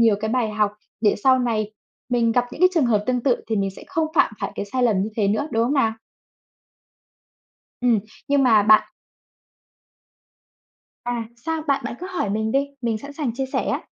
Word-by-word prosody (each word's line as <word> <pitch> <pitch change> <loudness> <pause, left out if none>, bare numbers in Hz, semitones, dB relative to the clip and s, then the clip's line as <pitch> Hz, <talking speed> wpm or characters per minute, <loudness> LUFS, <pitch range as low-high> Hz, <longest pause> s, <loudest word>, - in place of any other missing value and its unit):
nhiều 225 -3 +5
cái 220 - -2
bài 245 -3 +1
học 210 -1 +1 0.3
để 210 -2 +3
sau 260 -1 +6
này 220 -4 -1 0.4
mình 235 -2 +2
gặp 245 +1 +2
những - - -9
cái 365 - +7
trường 295 -7 +3
hợp 210 -3 +2
tương 250 -1 +1
tự 255 -2 +3
thì 220 -1 -1
mình 195 -1 0
sẽ 195 - -13
không 325 -4 0
phạm - - +4
phải - - -3
cái - - -3
sai 250 +5 -2
lầm 215 -6 +3
như 205 - -2
thế 205 -3 +2
nữa, 215 +9 0
đúng 225 +1 +2
không 265 +5 0
nào? 225 -5 +2 1.9
Ừm, 240 -4 +3 0.3
nhưng 280 -1 +3
mà 220 -5 +5
bạn 215 +1 +6 2.2
À, 240 -2 -3
sao? 320 +5 -3
Bạn 280 -1 +1
bạn 240 - -4
cứ 365 - -5
hỏi 280 - -2
mình 220 +1 -1
đi, 280 +1 +1
mình 225 -2 0
sẵn 280 +3 -9
sàng 280 -6 -3
chia 265 +2 -2
sẻ 265 - -2
á. - - -2
235 Hz, 205 wpm, -22 LUFS, 215-270 Hz, 2.2 s, cái